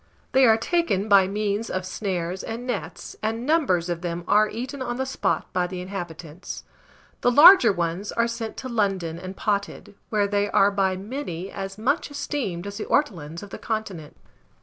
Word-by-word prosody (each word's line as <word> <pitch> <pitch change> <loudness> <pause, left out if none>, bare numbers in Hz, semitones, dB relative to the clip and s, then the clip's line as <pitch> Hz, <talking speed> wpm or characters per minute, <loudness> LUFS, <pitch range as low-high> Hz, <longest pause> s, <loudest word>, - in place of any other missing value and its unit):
They 265 -1 +5
are 220 -1 +6
taken 225 - 0
by 200 -3 +6
means 205 +2 -2
of 185 0 -3
snares 185 -2 -3
and 230 +2 -5
nets, 245 -5 -5
and 225 +3 -2
numbers 270 - +2
of 175 -1 -3
them 175 -1 -3
are 210 +1 +4
eaten 255 +5 -5
on 240 -2 -2
the 265 - -1
spot 265 - -2
by 180 -1 +1
the 180 0 -6
inhabitants. 175 -3 -7 0.6
The - - +4
larger 330 - +9
ones 175 +2 -2
are 230 0 +1
sent 235 -1 -5
to 260 - -5
London 195 -8 -1
and 185 +1 -8
potted, 200 -1 -2 0.2
where 210 -2 +2
they 205 0 0
are 200 +1 +4
by 190 -2 +1
many 195 - -5
as 195 0 -6
much 275 +10 0
esteemed 255 -11 -3
as 200 0 -6
the - - -4
ortolans 170 - -1
of 200 - -11
the - - -7
continent. 200 -9 -5
200 Hz, 180 wpm, -24 LUFS, 185-235 Hz, 0.6 s, larger